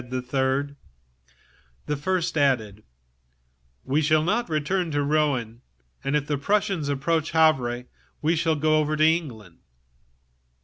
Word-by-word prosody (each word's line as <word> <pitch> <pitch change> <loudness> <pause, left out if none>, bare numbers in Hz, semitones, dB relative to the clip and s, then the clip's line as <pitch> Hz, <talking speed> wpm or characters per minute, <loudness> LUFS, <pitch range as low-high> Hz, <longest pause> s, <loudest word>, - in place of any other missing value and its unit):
The 125 +1 -5 1.7
first 175 +4 -1
speaker 160 - -3
added: 110 -6 0 1.0
"We 145 +4 0
shall 155 0 +3
not 210 +5 0
return 165 +4 -1
to 145 -1 0
Rouen, 140 -6 0 0.4
and 140 - -1
if 150 -1 0
the 145 -2 -2
Prussians 195 -3 0
approach 155 +3 -1
Havre 130 -7 +2 0.4
we 160 +2 +1
will 160 -2 +1
cross 155 0 +2
to 155 - +3
England." 125 - -1
150 Hz, 120 wpm, -24 LUFS, 135-160 Hz, 1.7 s, shall